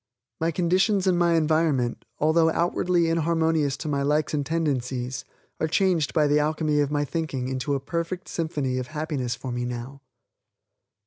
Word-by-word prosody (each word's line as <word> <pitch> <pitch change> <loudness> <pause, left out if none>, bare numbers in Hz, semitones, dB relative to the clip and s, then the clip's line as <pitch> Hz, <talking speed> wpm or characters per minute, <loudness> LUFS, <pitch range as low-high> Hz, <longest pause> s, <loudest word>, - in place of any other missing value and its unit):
My 165 - +1
conditions 185 +4 +2
and 185 -2 +3
my 170 -1 +3
environment, 155 -6 +1
although 160 +2 +3
outwardly 170 +1 +1
inharmonious 160 -3 +1
to 155 - -6
my 140 -2 0
likes 150 +2 +1
and 145 -1 0
tendencies, 130 -5 -2 0.4
are 160 - +1
changed 175 -3 +2
by 155 -3 +3
the 145 +1 +3
alchemy 155 0 +1
of 145 -1 +2
my 145 0 0
thinking 145 -5 -3
into 130 +2 -1
a - - -1
perfect 170 +5 -4
symphony 145 -6 -2
of 125 - -4
happiness 150 -5 -3
for 130 - -6
me 120 0 -2
now. 125 +3 -6
155 Hz, 165 wpm, -25 LUFS, 135-165 Hz, 0.4 s, and